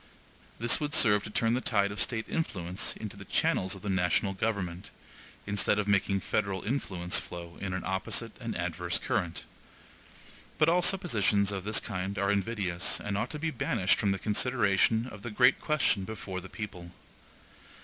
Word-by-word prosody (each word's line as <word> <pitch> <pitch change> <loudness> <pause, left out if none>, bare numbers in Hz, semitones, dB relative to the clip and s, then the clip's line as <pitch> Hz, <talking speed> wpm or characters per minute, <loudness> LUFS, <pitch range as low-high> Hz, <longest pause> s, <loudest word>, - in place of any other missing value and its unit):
This 120 +2 +4
would 150 -1 -2
serve 105 -4 +6
to - - -6
turn 115 +2 +1
the 125 - 0
tide 100 -5 +1
of 105 - -4
State 110 -3 0
influence 95 - -2
into 105 -2 -7
the 100 - -10
channels 95 0 +1
of 95 - -12
the 105 - -3
national 95 +1 +1
government, 95 -4 -2 0.6
instead 100 0 +1
of 105 -1 0
making 100 -1 +2
federal 100 -2 -1
influence 95 -8 -1
flow 85 -1 -8
in 95 -1 -3
an 90 0 -3
opposite 95 0 -2
and - - -4
adverse - - -1
current. 85 -1 -2 1.1
But 155 - +4
all 175 +2 +4
suppositions 105 - +3
of 95 -1 -4
this 105 +1 +2
kind 95 0 -4
are 100 +1 +2
invidious, 100 -3 0
and 105 -1 -3
ought 100 - -1
to 150 - -5
be 160 +1 -2
banished 115 -10 +1
from 100 - +2
the 95 - 0
consideration 110 0 +2
of 110 -5 -9
the 120 - -5
great 125 +4 +4
question 140 -10 +1
before 95 -3 -6
the 95 - -10
people. 90 -5 -7
100 Hz, 175 wpm, -30 LUFS, 95-115 Hz, 1.1 s, serve